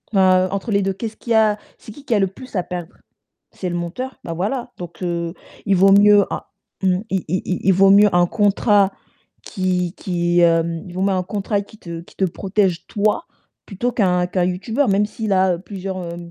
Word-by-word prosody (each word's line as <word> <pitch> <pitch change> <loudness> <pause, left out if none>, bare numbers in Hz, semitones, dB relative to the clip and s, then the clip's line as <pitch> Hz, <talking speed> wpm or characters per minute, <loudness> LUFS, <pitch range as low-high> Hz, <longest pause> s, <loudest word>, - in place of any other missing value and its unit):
Heu, 185 -1 +4
entre 195 +3 -3
les 200 -1 +2
2, 195 0 0
qu'est-ce 220 +3 -6
qu'il 235 - -7
y - - +4
a 215 -1 +4 0.2
c'est - - -12
qui 275 +6 -13
qui 255 - -1
a 210 - +3
le 195 - +2
plus 225 +6 -12
à 180 - 0
perdre? 175 +1 -6 0.6
C'est 185 - -5
le 175 - -3
monteur? 180 +10 -5
Ben, 165 - -5
voilà, 235 +8 -3
donc 175 0 -9
heu, 170 -1 -2 0.3
il 200 -2 +3
vaut 195 +2 +5
mieux 205 0 +6
un - - -3 0.4
mmh, 185 -1 +3
il 190 -2 -1
il 185 +4 -1
il 185 - -2
il 190 - +4
vaut 195 +2 +5
mieux 205 +1 +7
un 175 0 +4
contrat 205 -1 +3 0.5
qui 180 -3 -1
qui, 175 -1 0
hem, 165 -1 +2
il 175 - -10
vaut 185 - -3
mieux 195 +1 +2
un 185 -1 0
contrat 200 +2 -2
qui 205 +2 -15
te 170 -1 -7
qui 170 - -18
te 190 - +1
protège 190 0 -1
toi 210 +10 0 0.4
plutôt 240 +5 -2
qu'un 180 -6 +1
qu'un 180 0 0
youtubeur, 210 +10 -1
même 200 +1 +3
s'il 215 -1 -3
a 185 -2 +2
plusieurs 185 -3 -6
190 Hz, 215 wpm, -20 LUFS, 180-205 Hz, 0.6 s, mieux